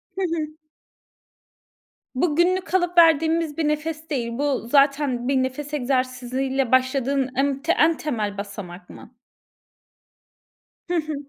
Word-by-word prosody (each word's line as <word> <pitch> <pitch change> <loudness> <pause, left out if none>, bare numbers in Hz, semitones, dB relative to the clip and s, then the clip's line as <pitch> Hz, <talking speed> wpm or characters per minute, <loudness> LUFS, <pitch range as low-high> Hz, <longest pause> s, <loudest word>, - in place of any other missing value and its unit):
Hı 385 - -3
hı. 335 -4 -1 1.7
Bu 295 +3 +1
günlük 370 +3 +1
alıp 355 -1 +1
verdiğimiz 325 -1 +4
bir 320 -2 0
nefes 310 +1 -3
değil. 245 -6 -2
Bu 280 -4 -1
zaten 275 -2 +2
bir 275 - +1
nefes 280 +3 -5
egzersiziyle 260 -1 -1
başladığın 260 +1 +1
em 275 +1 0 0.2
en 320 +1 +4
temel 215 -9 -3
basamak 200 -3 -8
mı? - - -13 1.8
Hı 355 - -1
hı. 310 -2 -2
280 Hz, 115 wpm, -23 LUFS, 255-320 Hz, 1.8 s, verdiğimiz